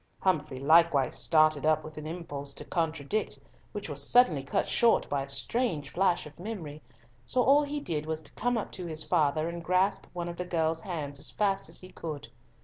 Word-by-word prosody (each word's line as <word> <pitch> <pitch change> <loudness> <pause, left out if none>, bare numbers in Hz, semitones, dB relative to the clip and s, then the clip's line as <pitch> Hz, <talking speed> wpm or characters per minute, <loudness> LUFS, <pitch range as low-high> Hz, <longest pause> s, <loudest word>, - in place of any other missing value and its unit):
Humfrey 150 -8 0
likewise 155 -1 +4
started 155 -2 +3
up 155 0 +3
with 155 0 -9
an 155 0 -7
impulse 145 -4 -6
to 150 - -6
contradict, 165 +4 -1 0.3
which 205 -1 -5
was 145 -2 -4
suddenly 175 - +4
cut 135 - -1
short 235 -1 +3
by 140 -1 +1
a 135 - -5
strange 150 - -1
flash 180 -1 +1
of 150 +2 -13
memory, 170 -7 -6 0.4
so 250 - +1
all 275 +5 +6
he 295 0 -3
did 155 - -3
was 160 0 -3
to - - -9
come 245 +1 0
up 215 - -4
to 180 -2 -6
his 155 -1 -1
father, 155 -2 +1
and 170 0 -5
grasp 185 +3 +1
one 175 -1 -4
of 170 0 -6
the 180 - -3
girl's 165 -2 0
hands 150 -7 -5
as 145 - -2
fast 195 -2 0
as - - -6
he 185 - -11
could. 155 -5 -7
165 Hz, 205 wpm, -29 LUFS, 150-185 Hz, 0.4 s, all